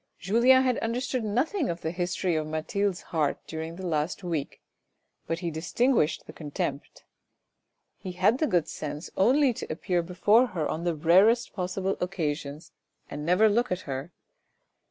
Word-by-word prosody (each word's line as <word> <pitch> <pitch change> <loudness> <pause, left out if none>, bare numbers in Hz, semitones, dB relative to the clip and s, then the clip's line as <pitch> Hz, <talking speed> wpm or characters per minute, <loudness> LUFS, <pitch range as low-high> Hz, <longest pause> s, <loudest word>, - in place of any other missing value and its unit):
Julien 235 +8 +4
had 255 -2 +1
understood 245 +2 -2
nothing 260 - 0
of 170 0 -4
the 160 - -2
history 175 0 -1
of 155 -1 -1
Mathilde's 175 +5 -1
heart 150 -3 +1
during 160 +1 -6
the 190 +1 -7
last 160 +2 -1
week, 165 -5 -3 0.7
but 165 - -1
he 170 -2 -2
distinguished 180 - +1
the - - -11
contempt. 145 -2 -5 1.0
He 185 - -6
had 195 +8 +2
the 310 - +2
good 175 - +1
sense 150 +3 -6
only 260 +6 +4
to - - -6
appear 175 +2 -1
before 205 +8 +3
her 155 - 0
on 165 +2 -3
the 170 -2 0
rarest 190 +10 +4
possible 190 0 -2
occasions, 155 -4 -3 0.4
and 145 +1 -5
never 180 +7 +4
looked 235 +2 +1
at 180 0 -1
her. 135 +4 -5
180 Hz, 155 wpm, -27 LUFS, 160-220 Hz, 1.0 s, Julien